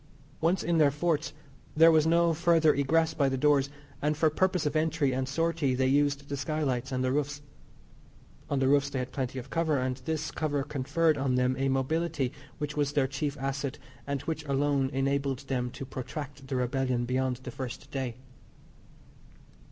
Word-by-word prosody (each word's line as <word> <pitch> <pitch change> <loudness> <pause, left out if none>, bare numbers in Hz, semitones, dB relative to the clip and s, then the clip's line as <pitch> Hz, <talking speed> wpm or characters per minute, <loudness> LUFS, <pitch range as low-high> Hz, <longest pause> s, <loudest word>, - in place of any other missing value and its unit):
Once 170 +4 +1
in 170 -1 +1
their 150 -2 +6
forts 155 +2 0 0.5
there 165 +1 +8
was 160 -1 +4
no 170 0 +4
further 165 -1 +4
egress 160 +4 +2
by 140 -3 +2
the 135 - -1
doors, 140 0 +3 0.3
and 150 +1 +1
for 155 -1 +3
purpose 185 +1 +1
of 150 +1 -1
entry 155 -3 +1
and 130 +1 -2
sortie 165 -2 0
they 130 +1 +1
used 140 +1 +2
the 140 - -3
skylights 135 -2 -2
and 130 0 -1
the 130 - +1
roofs. 145 +1 -2 1.1
On 140 - 0
the 135 0 +2
roofs 140 0 +3
they 140 - -4
had 125 0 -3
plenty 130 -1 -3
of 130 +1 -7
cover, 160 -3 +1
and 130 0 -1
this 160 0 -3
cover 145 -3 -1
conferred 150 +2 +1
on 135 -2 +1
them 125 0 +2
a 135 +1 0
mobility 135 0 0 0.3
which 150 0 -4
was 145 -1 0
their 140 -2 +3
chief 140 +2 -3
asset, 135 0 -3 0.3
and 140 -2 -2
which 160 -1 -3
alone 140 -1 +1
enabled 135 0 0
them 125 -2 -1
to 135 - -7
protract 135 +2 -7
the 135 - -3
rebellion 125 -1 0
beyond 130 +1 0
the 125 - -6
first 130 0 -7
day. 130 -4 -3
140 Hz, 185 wpm, -29 LUFS, 130-155 Hz, 1.1 s, there